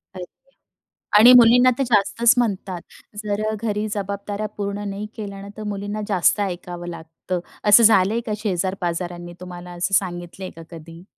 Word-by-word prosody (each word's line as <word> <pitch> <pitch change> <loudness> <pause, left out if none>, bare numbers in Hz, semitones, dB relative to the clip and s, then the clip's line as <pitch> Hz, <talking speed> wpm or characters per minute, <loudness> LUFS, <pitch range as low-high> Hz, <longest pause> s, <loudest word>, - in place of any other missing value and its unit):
अच्छा 185 - -11 0.7
आणि 240 +4 +9
मुलींना 245 +1 +6
तर - - +1
जास्तच 235 +2 +3
म्हणतात 195 -6 -1 0.4
जर 205 0 -2
घरी 215 -1 -2
जबाबदाऱ्या 200 +1 -4
पूर्ण 205 0 -4
नाही 200 +2 -5
केल्या 200 -2 -7
ना 200 - -9
तर 215 - -7
मुलींना 205 +1 -5
जास्त 195 +1 +2
ऐकावं 175 -2 -5
लागतं. 165 +2 -6 0.2
असं 210 +2 +7
झालंय 220 0 +4
का 215 - -2
शेजार-पाजारांनी 175 -3 -3
तुम्हाला 180 -1 -9
असं 175 +3 -2
सांगितलंय 180 0 -2
का 165 - -10
कधी? 165 +1 -12
200 Hz, 145 wpm, -21 LUFS, 175-210 Hz, 0.7 s, आणि